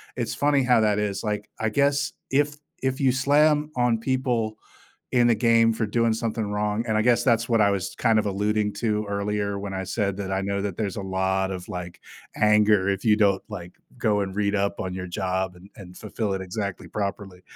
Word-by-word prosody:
it's 120 -3 -2
funny 145 -2 +2
how 125 -3 +4
that 105 -1 +2
is, 105 -1 -2
like, 105 -1 -3
I 110 0 0
guess 140 +4 +1 0.2
if 145 +2 +1 0.3
if 130 +1 0
you 130 - +4
slam 150 +3 +3
on 120 -2 +2
people 120 -3 -1 0.6
in 120 -1 +4
a - - +5
game 115 +1 +4
for 110 0 -1
doing 115 +1 +1
something 110 -2 -2
wrong, 105 +2 -1
and 110 -1 0
I 110 - +3
guess 120 0 +3
that's 115 -2 +2
what 115 -2 +3
I 100 -1 +5
was 95 -2 -3
kind 115 -2 +2
of 105 - 0
alluding 105 +1 0
to 105 0 -1
earlier 100 0 -2
when 100 -1 -5
I 95 - -2
said 100 0 -2
that 95 -1 -4
I 95 0 0
know 100 0 -2
that 100 -4 -3
there's 100 -4 -2
a 100 - -5
lot 95 0 0
of, 90 -2 -6
like, 90 -1 -7 0.4
anger 105 -2 +4
if 100 +2 -1
you 105 -2 +5
don't, 100 -3 +2
like, 90 -4 -8 0.3
go 105 -3 +1
and 95 -1 -3
read 105 0 +1
up 100 0 0
on 95 -1 -4
your 95 -1 -5
job 95 -1 -2
and 95 +3 -15
and 90 -2 -12
fulfill 105 -1 -3
it 95 - -3
exactly 100 +1 -5
properly. 100 -2 -4
105 Hz, 215 wpm, -25 LUFS, 100-115 Hz, 0.6 s, a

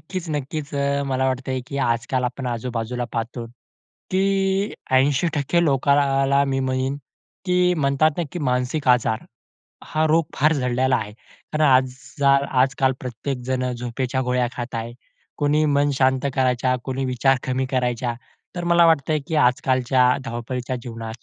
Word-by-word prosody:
नक्कीच, 185 -3 -6
नक्कीच. 150 0 -4
अ, 140 0 0
मला 130 -1 0
वाटतंय 130 0 -2
की 140 - -6
आजकाल 120 +2 0
आपण 125 +1 -3
आजूबाजूला 120 0 -3
पाहतो 115 +1 -4 0.6
की 190 +1 +2 0.7
80% 145 +4 +2
लोकांना 140 -1 +2
मी 135 -1 -1
म्हणेन 130 +1 -1 0.5
की 180 -1 +1 0.2
म्हणतात 145 0 +2
ना, - - +1
की - - -4
मानसिक 130 0 -1
आजार, 120 -3 +2 0.6
हा 155 0 0
रोग 160 +1 +3
फार 155 +3 +3
झडलेला 130 -1 +1
आहे. 105 -2 -5 0.4
कारण 155 0 +2
आज 130 -1 +3 0.2
जाल 140 -1 +4 0.2
आजकाल 135 0 0
प्रत्येकजण 125 0 -3
झोपेच्या 125 +2 -3
गोळ्या 125 0 +2
खात 120 0 -5
आहे. 115 +1 -4 0.5
कोणी 150 +1 +2
मन 145 0 +2
शांत 130 0 +2
करायच्या, 130 -1 +1
कोणी 135 0 -3
विचार 130 +1 +2
कमी 130 +1 -1
करायच्या. 125 -2 -1 0.4
तर 175 - -3
मला 170 0 +6
वाटतंय 155 -1 +2
की 160 - -3
आजकालच्या 130 0 +2 0.2
धावपळीच्या 125 +1 -4
जीवनात 115 -1 -8
130 Hz, 140 wpm, -22 LUFS, 125-140 Hz, 0.7 s, मला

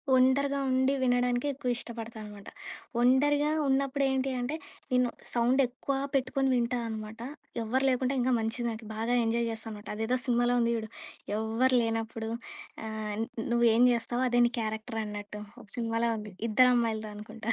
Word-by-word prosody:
ఒంటరిగా 275 +2 +3
ఉండి 260 +1 +3
వినడానికే 245 +1 +2
ఎక్కువ 255 -2 -3
ఇష్టపడతానమాట. 220 -4 -8 0.5
ఒంటరిగా 290 +4 +4 0.2
ఉన్నప్పుడు 275 +1 +1
ఏంటి 265 0 0
అంటే, 265 +6 -2 0.4
నేను 250 -1 +3 0.2
సౌండెక్కువా 255 +2 +1 0.2
పెట్టుకొని 270 0 +1
వింటా 245 +1 +1
అనమాట. 220 0 -6 0.4
ఎవ్వరు 255 +5 0
లేకుంటే 255 +1 +1
ఇంకా 255 +1 +2
మంచిది 225 +2 -1
నాకీ. 220 0 -7
బాగా 230 +3 0
ఎంజాయ్ 235 +1 +1
జేస్తానమాట. 220 -2 -7
అదేదో 225 +4 0
సినిమాలో 245 -1 +2
ఉంది 235 0 +2
జూడు, 220 -1 -5 0.5
ఎవ్వరు 230 +4 +2
లేనప్పుడు 225 0 -2 0.6
ఆహ్, 215 -1 -4
న్ - - -5 0.2
నువ్వేం 235 0 +5
జేస్తావో 240 +2 -1
అదే 245 0 +4
నీ - - -5
క్యారెక్టరన్నట్టు 215 -2 -4 0.2
ఒక - - -16
సినిమాలో 230 0 0
ఉంది. 210 -2 -8 0.2
'ఇద్దరు 250 +4 +6
అమ్మాయిలతో' 220 -3 0
అనుకుంటా. 215 +2 -7
235 Hz, 140 wpm, -29 LUFS, 220-255 Hz, 0.6 s, ఇద్దరు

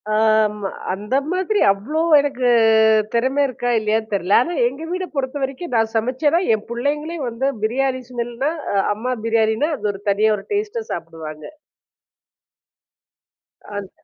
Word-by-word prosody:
ஆம்மா 215 -2 +2 0.2
அந்த 210 +6 -3 0.2
மாதிரி 375 +3 0
அவ்ளோ 265 +12 -2 0.2
எனக்கு 260 -3 0 0.6
திறமை 260 +4 +1
இருக்கா, 245 -1 -3
இல்லையான்னு 220 0 -1
தெரில. 195 0 -1
ஆனா 345 +7 -2
எங்க 270 +6 -6
வீட 370 0 -2
பொறுத்த 265 0 -2
வரைக்கும் 270 +3 -4
நான் 225 0 +1
சமைச்சேன்னா 260 +8 +1 0.2
என் 215 - -8
புள்ளைங்களே 295 +7 -2
வந்து 260 +4 -1
பிரியாணி 260 +3 0
ஸ்மெல்னா 240 +4 -2 0.4
அம்மா 250 +4 -3
பிரியாணினா 225 +5 +2
அது 210 - -2
ஒரு 195 - -10
தனியா 215 +2 +3
ஒரு 195 - -10
டேஸ்ட்டா 430 +2 -2
சாப்பிடுவாங்க. 160 -2 -7 2.2
அந். 205 -2 -6
240 Hz, 130 wpm, -20 LUFS, 215-285 Hz, 2.2 s, தனியா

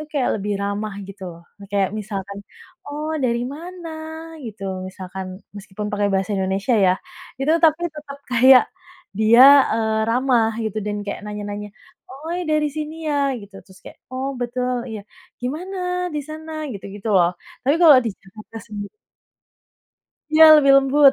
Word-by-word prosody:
tuh 305 - -7
kayak 275 -4 0
lebih 205 +1 -3
ramah 200 0 -3
gitu 195 0 -11
loh. 170 - -16 0.3
Kayak 200 -2 +1
misalkan, 200 -1 -6 0.5
"Oh, 300 +2 -4
dari 235 -1 0
mana?" 345 +1 -9 0.6
Gitu, 210 -2 -9 0.2
misalkan 190 0 -7 0.3
meskipun 205 +1 -7
pake 205 0 0
Bahasa 190 +1 -1
Indonesia 195 +6 0
ya, 180 - +5 0.5
itu 285 - +1
tapi 315 +1 +4
tetap 290 -2 -9
kayak 255 +1 +7 0.6
dia, 225 +3 +6 0.3
eee, 220 -1 0
ramah, 245 -2 +2
gitu, 215 0 -3
dan 205 0 -2
kayak 200 - -4
nanya-nanya, 210 0 -6 0.4
"Oh, 310 +6 -6 0.2
dari 305 -1 +2
sini 310 +1 -4
ya?" 290 -1 +1 0.2
Gitu. 200 -1 -14
Terus 190 -1 -17
kayak - - -12
"Oh, 260 +1 -3
betul, 250 +1 -2
iya. 220 -1 -6 0.4
Gimana, 350 +9 -4 0.4
di - - -1
sana?" 315 +1 -8 0.2
Gitu-gitu 200 +1 -7
loh. 175 -1 +4 0.3
Tapi 275 +3 +2
kalau 300 -6 +9
di 230 - -1
Jakarta 215 +3 -13
sendi 205 -1 -6 1.5
Ya, 315 +1 +8
lebih 275 -2 +5
lembut, 275 +1 +5
225 Hz, 150 wpm, -21 LUFS, 205-285 Hz, 1.5 s, kalau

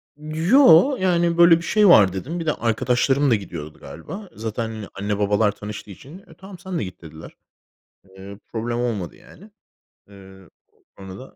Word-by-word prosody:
Yo, 165 - +4
yani, 175 -2 +1
böyle 170 -1 +6
bir - - -8
şey 210 +4 +2
var 100 - +6
dedim. 155 - -5
Bir 165 - -5
de 155 - +1
arkadaşlarım 125 +4 0
da - - +5
gidiyordu 85 -7 -8
galiba. 190 - -10
Zaten, 110 +1 -4
hani, 110 -2 -8
anne, 100 +1 -4
babalar 105 +1 +1
tanıştığı 105 0 -9
için, 140 - -13
eee, 195 - -18
tamam, 190 -1 -12
sen 185 -1 -5
de - - -3
git 90 -3 -10
dediler. 80 -1 -12 0.8
Eee, 95 +1 -12
problem 120 +1 -3
olmadı 110 -8 -4
yani. 205 +5 -18 0.6
Eee, 95 -2 -16 0.5
sonra 95 -1 -10
da. 130 - -14
115 Hz, 170 wpm, -21 LUFS, -, 0.8 s, böyle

